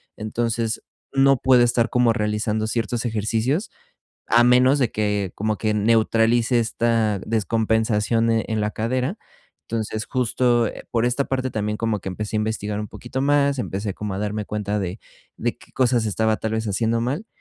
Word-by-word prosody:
Entonces, 115 +1 -2 0.3
no 135 -1 +4
puedo 125 -1 +5
estar 120 -1 +2
como 125 -2 +3
realizando 105 0 -1
ciertos 115 +1 -2
ejercicios, 115 - -1 0.6
a 120 +1 +5
menos 125 +3 +5
de 125 -4 +1
que, 105 -3 -1
como 110 0 -1
que 110 -1 0
neutralice 115 +2 +3
esta 115 -2 +1
descompensación, 110 +1 +1
eh, 115 0 +1
en 110 -1 -1
la 105 - 0
cadera. 130 - -2 0.5
Entonces, 110 -1 -3
justo, 120 -2 +1
eh, - - -7
por 115 0 +1
esta 125 +3 +1
parte 130 -1 -1
también 105 -1 -2
como 110 -2 -1
que 95 - -6
empecé 105 +3 -4
a - - +2
investigar 105 -1 -2
un 105 - -5
poquito 120 +2 -6
más, 140 -1 +2
empecé 100 -4 -3
como 105 -2 -4
a 95 - -4
darme 105 0 -2
cuenta 105 0 -2
de 95 +1 -4 0.4
de - - -2
qué - - -19
cosas 120 -3 +2
estaba, 110 +1 +1
tal 110 - -3
vez, 110 0 -1
haciendo 115 +3 0
mal 140 - -2
115 Hz, 170 wpm, -22 LUFS, 105-120 Hz, 0.6 s, puedo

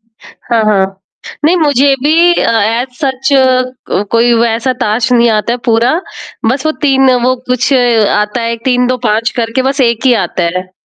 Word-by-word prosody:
हाँ, 225 0 -5
हाँ। 195 -2 0 0.5
नहीं 340 +4 +3
मुझे 285 -3 +2
भी 335 +4 +3
अ, - - +1
एज़ 230 +4 -1
सच 265 -2 -2 0.6
क 205 - 0
कोई 235 +1 +3
वैसा 235 +2 0
ताश 230 +2 0
नहीं 235 -1 +3
आता 215 +2 0
है 245 - -3
पूरा। 235 +3 +2 0.6
बस 265 +4 -2
वो 310 - +1
3 270 -2 +3
वो 255 0 +2 0.2
कुछ 255 +3 0 0.4
आता 210 +3 -1
है 230 0 -2
3-2-5 245 -3 0
करके 230 +3 -1
बस 275 +1 -2
एक 235 0 +1
ही 250 - +4
आता 180 - -4 0.2
है। 185 0 -9
240 Hz, 165 wpm, -11 LUFS, 225-265 Hz, 0.6 s, ही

